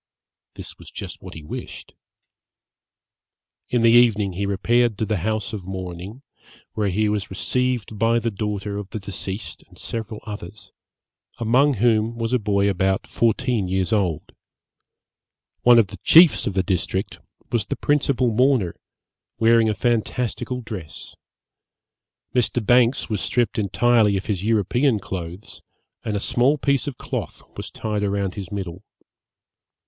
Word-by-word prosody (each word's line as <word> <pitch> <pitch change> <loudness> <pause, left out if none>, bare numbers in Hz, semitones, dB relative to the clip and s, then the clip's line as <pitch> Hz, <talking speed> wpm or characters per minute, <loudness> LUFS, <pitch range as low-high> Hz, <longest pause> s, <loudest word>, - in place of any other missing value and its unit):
This - - -10
was - - -12
just - - -8
what - - -10
he 80 - -9
wished. 75 - -8 1.8
In 120 -2 +1
the 115 - +6
evening 110 -5 +4
he 100 +3 -2
repaired 115 +3 +2
to 110 - -1
the 110 -1 -1
house 110 +4 -2
of 95 -4 -6
mourning, 95 +5 -7 0.5
where 105 -2 0
he 105 +3 +1
was 105 -1 -1
received 120 +1 -2
by 115 +1 +3
the 115 0 -1
daughter 105 0 -3
of 100 -2 -7
the - - -5
deceased 100 0 -6
and - - -19
several 110 -2 -5
others, 105 -1 -8 0.7
among 130 +5 +3
whom 115 +1 +2
was 115 +1 -2
a 125 - +3
boy 100 -2 +1
about 95 0 0
fourteen 115 -2 0
years 95 +3 0
old. 95 -7 0 1.3
One 120 -1 +7
of 115 - +6
the - - -9
chiefs 165 -1 +6
of 100 - -1
the 95 - +2
district 95 0 -2 0.3
was 115 -4 0
the - - -2
principal 135 -4 +1
mourner, 125 -6 +2 0.6
wearing 115 -1 +4
a 105 - 0
fantastical 120 +3 -1
dress. 100 -9 -8 1.2
Mr. 120 -2 0
Banks 125 +2 +3
was 105 -3 -2
stripped 120 -2 0
entirely 105 0 +3
of 95 - -5
his 100 -3 -2
European 115 +4 +2
clothes, 95 0 -7 0.4
and 105 - -2
a - - 0
small 125 +7 +2
piece 140 0 0
of 140 - -5
cloth - - -5
was - - -6
tied 105 -2 -3
round 100 -2 -1
his 95 -1 -7
middle. 95 -2 -5
110 Hz, 145 wpm, -22 LUFS, 100-120 Hz, 1.8 s, One